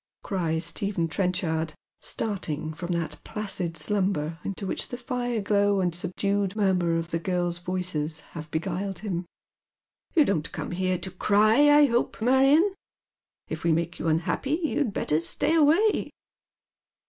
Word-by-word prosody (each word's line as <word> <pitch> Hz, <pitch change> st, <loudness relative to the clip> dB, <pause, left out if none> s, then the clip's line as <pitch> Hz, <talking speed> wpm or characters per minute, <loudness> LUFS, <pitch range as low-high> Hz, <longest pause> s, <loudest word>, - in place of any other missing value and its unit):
cries 165 Hz, -4 st, -1 dB
Stephen 195 Hz, -5 st, -1 dB
Trenchard, 165 Hz, -3 st, -1 dB, 0.3 s
starting 160 Hz, -7 st, -2 dB
from 175 Hz, +3 st, -5 dB
that 170 Hz, -2 st, -3 dB
placid 190 Hz, -5 st, -2 dB
si 155 Hz, +6 st, -1 dB
umber 175 Hz, -5 st, 0 dB
into 195 Hz, 0 st, -4 dB
which 190 Hz, -, 0 dB
the 245 Hz, -, -5 dB
fire 245 Hz, -1 st, -2 dB
glow 200 Hz, 0 st, +2 dB
and 180 Hz, -2 st, +1 dB
tlie -, -, -6 dB
subdued 200 Hz, +1 st, -1 dB
murmur 180 Hz, -5 st, +2 dB
of 165 Hz, +1 st, -4 dB
the 165 Hz, -, 0 dB
girls' 175 Hz, -1 st, -1 dB
voices 175 Hz, -4 st, -3 dB
have 155 Hz, -2 st, -8 dB
beguiled 185 Hz, +4 st, -2 dB
him. 175 Hz, -3 st, -3 dB, 0.4 s
" -, -, -46 dB
You 310 Hz, -3 st, +6 dB
don't 165 Hz, -, -1 dB
come -, -, -5 dB
here 185 Hz, +1 st, 0 dB
to 190 Hz, -, -6 dB
cry, 215 Hz, +9 st, +4 dB
I 295 Hz, 0 st, +7 dB
hope, 240 Hz, -3 st, 0 dB
Marion. 270 Hz, -, +4 dB, 0.7 s
If 160 Hz, +1 st, -5 dB
we 170 Hz, -, +3 dB
make 170 Hz, +1 st, -1 dB
you -, -, -2 dB
unhappy 175 Hz, -, 0 dB
you'd 290 Hz, -6 st, 0 dB
better 155 Hz, -5 st, 0 dB
stay 290 Hz, -, 0 dB
away." 330 Hz, +8 st, +4 dB
185 Hz, 155 wpm, -26 LUFS, 165-215 Hz, 0.7 s, I